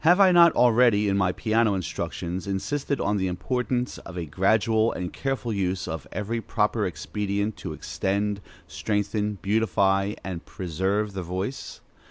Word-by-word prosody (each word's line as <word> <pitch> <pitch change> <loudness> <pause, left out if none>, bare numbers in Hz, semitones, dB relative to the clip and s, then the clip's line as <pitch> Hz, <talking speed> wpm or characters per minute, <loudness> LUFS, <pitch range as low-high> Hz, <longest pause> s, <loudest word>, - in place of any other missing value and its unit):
Have 175 +4 +6
I 190 -2 +7
not 170 -2 +7
already, 120 -3 +4
in 100 - +2
my 95 -2 +2
piano 110 +1 +1
instructions, 90 0 -4
insisted 140 +9 -2
on 105 +1 +1
the 95 -1 0
importance 125 +6 -2
of 90 - -10
a 85 - -3
gradual 110 +7 +2
and 90 -1 -5
careful 135 -4 -2
use 95 -3 -1
of 80 -4 -5
every 115 +3 -3
proper - - 0
expedient 105 +1 -2
to - - -6
extend, 100 +1 -2 0.3
strengthen, 105 0 -1
beautify, 100 -1 +2
and 90 -3 -5
preserve 95 +4 -2
the 95 - -3
voice? 95 +9 -5
105 Hz, 150 wpm, -25 LUFS, 95-115 Hz, 0.3 s, I